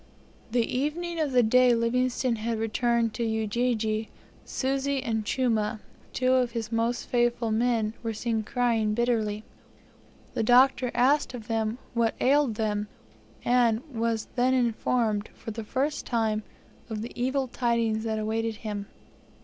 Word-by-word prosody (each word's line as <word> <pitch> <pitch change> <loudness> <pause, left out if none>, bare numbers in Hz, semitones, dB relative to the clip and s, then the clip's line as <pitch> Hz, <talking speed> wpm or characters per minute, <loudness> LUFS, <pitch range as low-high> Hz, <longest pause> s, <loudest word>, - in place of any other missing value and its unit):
The 235 0 +2
evening 325 +7 -2
of 305 -3 0
the 250 -1 +4
day 250 +2 +5
Livingstone 245 +1 +1
had 225 +1 -2
returned 230 +1 +1
to 235 - -2
Ujiji, 220 0 0 0.3
Susi 275 0 -1
and 220 -2 -1
Chuma, 220 -2 0 0.3
two 255 0 +2
of 250 -2 +2
his 230 -1 -4
most 230 +1 0
faithful 240 -2 +1
men, 225 -1 +1
were 230 -1 -2
seen 225 0 -1
crying 225 -1 0
bitterly. 220 -3 0 0.9
The - - -1
Doctor 250 +2 +5
asked 260 +2 +3
of 230 -2 -9
them 225 0 -1 0.2
what 230 -1 +1
ailed 275 -3 +3
them, 210 -1 -1 0.6
and 240 -1 +3
was 230 -1 -1
then 255 +1 +3
informed, 230 -3 0
for 225 - -7
the 225 +1 -5
first 275 +7 -2
time, 220 -3 0 0.5
of 215 -1 -4
the 235 - -6
evil 260 +2 0
tidings 235 -3 0
that 220 -1 -1
awaited 220 +1 -1
him. 205 -2 -5
235 Hz, 140 wpm, -27 LUFS, 220-250 Hz, 0.9 s, day